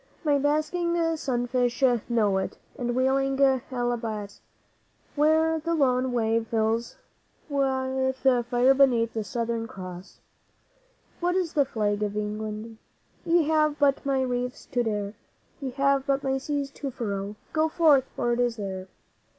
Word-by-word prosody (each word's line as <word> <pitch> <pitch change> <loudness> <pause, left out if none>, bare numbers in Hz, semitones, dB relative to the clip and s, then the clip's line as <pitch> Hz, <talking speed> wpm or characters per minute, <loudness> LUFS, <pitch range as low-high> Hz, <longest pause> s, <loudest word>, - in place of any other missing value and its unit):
'My 290 -3 +3
basking 310 +4 0 0.2
sunfish 245 -2 -1 0.3
know 210 -5 +2
it, 190 - -4 0.2
and 240 -1 -2
wheeling 270 +1 +1 0.3
albatross, 230 -5 -3 0.7
Where 315 +2 +3
the 335 +2 -1
lone 255 -3 +2
wave 225 -1 0
fills 225 +1 -1 0.5
with 265 -2 0 0.3
fire 245 +2 +4
beneath 245 -4 +3
the 220 - -2
Southern 230 +2 -2
Cross. 185 -2 -9 1.0
What 355 +1 0
is 365 -4 0
the 285 -3 +3
Flag 210 -5 -1
of 210 0 -2
England? 215 +1 -4 0.5
Ye 340 0 +4
have 305 -1 +2
but 285 -2 +2
my 270 -2 +1
reefs 250 0 -3
to 245 - +1
dare, 210 -3 -2 0.5
Ye 270 - -3
have 275 0 +1
but 275 0 +1
my 270 0 0
seas 280 0 -3
to 280 -1 -5
furrow. 205 -4 -4 0.2
Go 315 0 +2
forth, 310 -6 +4
for 240 - 0
it 235 - -1
is 240 -1 +1
there! 190 -3 -5
255 Hz, 140 wpm, -26 LUFS, 225-280 Hz, 1.0 s, fire